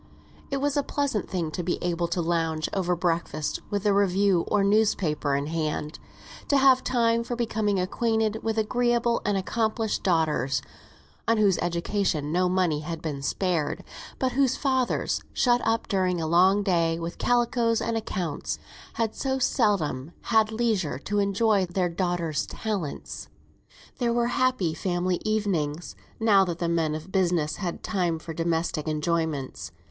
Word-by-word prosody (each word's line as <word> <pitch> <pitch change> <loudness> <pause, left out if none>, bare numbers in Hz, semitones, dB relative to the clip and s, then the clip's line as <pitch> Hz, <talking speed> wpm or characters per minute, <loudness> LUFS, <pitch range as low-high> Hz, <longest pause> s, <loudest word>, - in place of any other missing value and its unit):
It 275 - -1
was 280 +1 0
a 290 - +3
pleasant 280 -6 -2
thing 170 -5 -2
to 180 - -3
be 175 +1 -1
able 175 -1 0
to 170 0 -1
lounge 165 -2 0
over 180 -2 +1
breakfast 170 -3 -1
with 205 0 -2
a 205 - +4
review 195 -2 +3
or 200 - +2
newspaper 195 -8 +2
in 140 +1 -1
hand; 155 -1 -3 0.5
to 285 - +3
have 265 -1 +5
time 230 -2 +2
for 240 +1 -4
becoming 215 -4 0
acquainted 220 +3 0
with 225 0 -2
agreeable 235 +1 +1
and 205 -1 +1
accomplished 220 +2 -1
daughters, 150 -7 +1 0.6
on 230 0 +3
whose 200 -4 +3
education 170 -3 -1
no 180 +2 +2
money 180 -5 +1
had 160 +2 -5
been 150 -4 -4
spared, 170 +1 -1 0.3
but 260 -1 0
whose 260 0 +2
fathers, 260 -3 0
shut 245 -1 +3
up 225 0 0
during 185 -4 +1
a 160 - -1
long 185 +5 +4
day 170 -4 +1
with 170 0 -6
calicoes 240 -1 +2
and 230 - -1
accounts, 190 -7 -3 0.4
had 225 -2 -1
so 265 -1 -1
seldom 175 - 0 0.2
had 220 -1 +4
leisure 220 - 0
to 205 +9 -2
enjoy 200 0 +2
their 175 0 0
daughters' 170 -3 -1
talents. 200 -10 -4 0.7
There 240 -2 +1
were 235 0 +1
happy 250 -10 +1
family 175 +1 -1
evenings, 180 -8 -1 0.2
now 210 -4 +5
that 170 -2 -3
the 170 -1 -1
men 165 -2 +1
of 160 +4 -8
business 175 -5 +1
had 180 -4 -4
time 175 -5 0
for 160 +1 -7
domestic 165 -1 -1
enjoyments. 155 - -2
185 Hz, 155 wpm, -26 LUFS, 165-225 Hz, 0.7 s, have